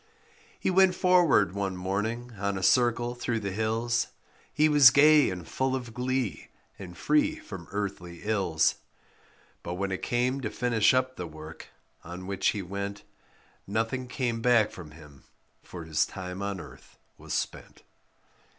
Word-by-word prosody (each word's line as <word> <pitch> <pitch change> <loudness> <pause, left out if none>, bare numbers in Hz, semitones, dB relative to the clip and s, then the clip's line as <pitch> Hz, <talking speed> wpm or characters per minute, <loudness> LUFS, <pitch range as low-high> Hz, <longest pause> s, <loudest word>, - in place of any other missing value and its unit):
He - - 0
went 190 0 +5
forward 175 - +4
one 100 -1 -3
morning 110 +6 -3
on 100 -1 -1
a 95 - -5
circle 120 +1 +3
through 120 -1 -2
the 100 -2 -4
hills, 115 +3 0 0.4
He 155 +1 +3
was 145 -4 +8
gay 150 +2 +6
and 90 -3 -6
full 130 0 -1
of 120 -3 -6
glee, 125 - -2 0.3
and 90 -2 -9
free 300 +1 +2
from 315 -1 -9
earthly 95 -4 -5
ills; 95 -7 +1 0.8
But 85 - -5
when 100 +1 -2
it 95 - -3
came 125 +3 0
to 110 - -3
finish 115 -1 +2
up 130 0 0
the 90 - -5
work 80 0 -11 0.4
on 90 +2 -8
which 100 0 -1
he 100 - 0
went, 100 +2 -5 0.6
Nothing 115 +5 -2
came 125 -3 -2
back 115 -3 +4
from 85 -4 -10
him; 75 -3 -16 0.4
for 85 -2 -9
his 80 -2 +1
time 90 +1 -7
on 100 -1 -3
earth - - -13 0.2
was - - -5
spent. - - -5
110 Hz, 155 wpm, -28 LUFS, 95-125 Hz, 0.8 s, was